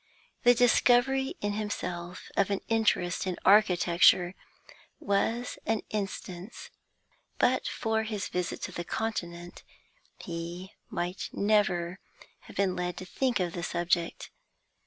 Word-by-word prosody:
The 245 0 +6
discovery 245 +2 +3
in 205 0 -1
himself 180 -4 -5
of 200 - +2
an 200 -1 -1
interest 210 -6 +1
in 180 - -2
architecture 180 -3 +5 0.7
was 225 +4 -1
an 225 -1 0
instance; 195 -1 -5 0.7
but 255 +1 +2
for 220 -1 0
his 215 -3 -3
visit 180 -1 -3
to - - -3
the 175 - -4
Continent 175 -4 -4 0.6
he 170 +2 -6 0.2
might 175 +2 -3
never 190 -4 +1 0.5
have - - -13
been 195 -2 +1
led 180 -1 -3
to 185 - -6
think 250 +4 0
of 175 -2 -1
the 175 - -4
subject. 170 0 -1
190 Hz, 120 wpm, -29 LUFS, 175-220 Hz, 0.7 s, The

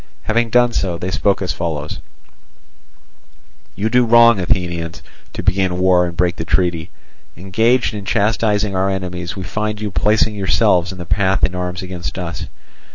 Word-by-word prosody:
Having 115 +1 0
done 120 +1 +3
so, 90 -3 -1
they 90 +2 -4
spoke 100 +1 +1
as 90 - -2
follows: 75 -3 -4 1.8
"You 105 +3 -1
do 125 +2 +3
wrong, 115 -2 +6
Athenians, 85 -4 -2 0.3
to - - -5
begin 95 -2 +1
war 90 -1 +3
and 85 -1 -8
break 90 0 +1
the - - -3
treaty. 85 -1 0 0.5
Engaged 110 +8 +1
in 105 -1 -6
chastising 105 -1 0
our 95 +1 +1
enemies, 90 -2 -4
we 95 - -6
find 105 +4 -3
you 105 -1 -4
placing 105 +3 +2
yourselves 95 -2 +2
in 95 - -9
our 90 - -7
path 95 +2 +1
in 90 - +2
arms 90 +1 -4
against 90 -1 -6
us. 85 -2 -5
95 Hz, 160 wpm, -18 LUFS, 90-105 Hz, 1.8 s, wrong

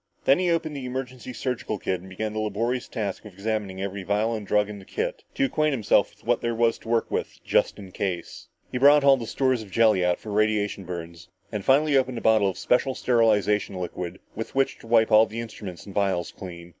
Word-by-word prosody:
Then 135 - +5
he 180 -1 +1
opened 165 -3 0
the 135 -2 -5
emergency 130 -1 -5
surgical 125 -3 -3
kit 95 -2 -2
and 95 - -12
began 105 +3 -4
the 110 - -2
laborious 115 +4 -1
task 105 -5 -4
of 105 -3 -11
examining 100 -1 -3
every 100 0 -4
vial 105 +4 0
and 105 -3 -5
drug 105 +1 +2
in 105 -1 -8
the - - -12
kit - - -4
to 275 - +2
acquaint 155 - +1
himself 115 -7 +3
with - - -25
what - - +1
there 115 0 -1
was 115 0 +2
to 115 - -11
work 115 -1 +1
with - - -3
just - - +2
in 95 -3 -10
case. 90 -4 -4 0.2
He 125 - -2
brought 145 +2 +7
all 140 -1 +7
the 115 -3 -6
stores 130 -2 +1
of 105 - -10
jelly 110 -3 +4
out 90 0 +2
for 110 - -8
radiation 105 -2 +1
burns 85 -1 -7 0.2
and 105 -3 -3
finally 145 +4 +4
opened 130 -2 +2
a - - -4
bottle 110 -3 +4
of 95 - -6
special 130 +1 +1
sterilization 105 -5 +2
liquid 90 0 -5 0.2
with 115 +4 -6
which 135 0 +1
to - - -14
wipe 115 -1 +4
all 110 +1 +7
the 110 +2 -6
instruments 105 -6 -7
and 100 - -10
vials 95 -4 0
clean. 85 -2 -9
110 Hz, 230 wpm, -25 LUFS, 100-125 Hz, 0.2 s, brought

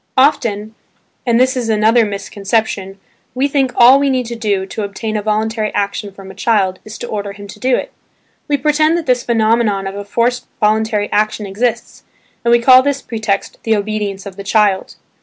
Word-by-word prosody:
Often 225 -6 +2 0.5
(and 235 0 +3
this 260 +1 +3
is 240 -3 -2
another 220 +2 +3
misconception) 200 -1 -2 0.4
we 265 +3 +1
think 275 -2 0
all 250 +3 +7
we 280 0 +1
need 255 -2 0
to 235 +1 -5
do, 205 -4 -1
to 205 - -6
obtain 210 +2 -4
a 210 - 0
voluntary 215 +1 -1
action 200 0 -2
from 195 0 -11
a - - -12
child, 195 -2 0
is 215 +1 -9
to 240 - -6
order 205 -2 -4
him 200 0 -11
to 200 - -11
do 255 0 +2
it. - - -4 0.6
We 290 - +1
pretend 310 +3 +2
that 335 - -4
this 250 -1 +2
phenomenon 220 -4 +1
of 195 - -4
a 200 0 -6
forced 240 +4 -1
voluntary 215 -1 +1
action 215 0 0
exists, 235 +4 -2 0.4
and 235 - +2
we 240 - +7
call 255 +2 +7
this 280 0 -1
pretext, 220 -4 -3
"the 225 -1 +1
obedience 205 -2 -3
of 195 -1 -9
the 200 - -6
child." 205 -2 +1
220 Hz, 195 wpm, -16 LUFS, 200-240 Hz, 0.6 s, all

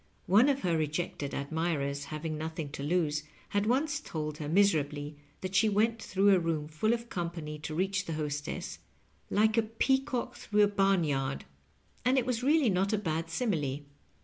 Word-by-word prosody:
One 215 +9 +5
of 275 -1 +1
her 170 -2 +1
rejected 155 -2 -2
admirers, 145 -1 -1
having 155 +2 -4
nothing 160 -1 -4
to 140 - -6
lose, 150 -1 +1 0.3
had 205 +1 0
once 285 +5 +1
told 155 - -5
her 150 -1 -4
miserably 150 -6 +2 0.3
that 185 0 -4
she 200 +3 +4
went 220 +2 +1
through 195 0 +3
a 185 - +5
room 165 -3 -1
fall 155 +9 0
of 235 0 -1
company 165 -5 -4
to 155 +1 -5
reach 190 +1 0
the 165 - -3
hostess, 150 -1 -4 0.5
^^like 220 +2 +3
a - - +6
peacock 250 +3 0
through 210 -1 +2
a - - +6
barn 195 -3 +2
yard,'' 135 -2 -1 0.6
and 255 +2 +3
it 255 - +2
was 250 -2 -1
really 285 -3 +4
not 190 +2 +1
a - - +3
bad 165 -4 -2
simile. 160 - -1
175 Hz, 175 wpm, -30 LUFS, 150-215 Hz, 0.6 s, a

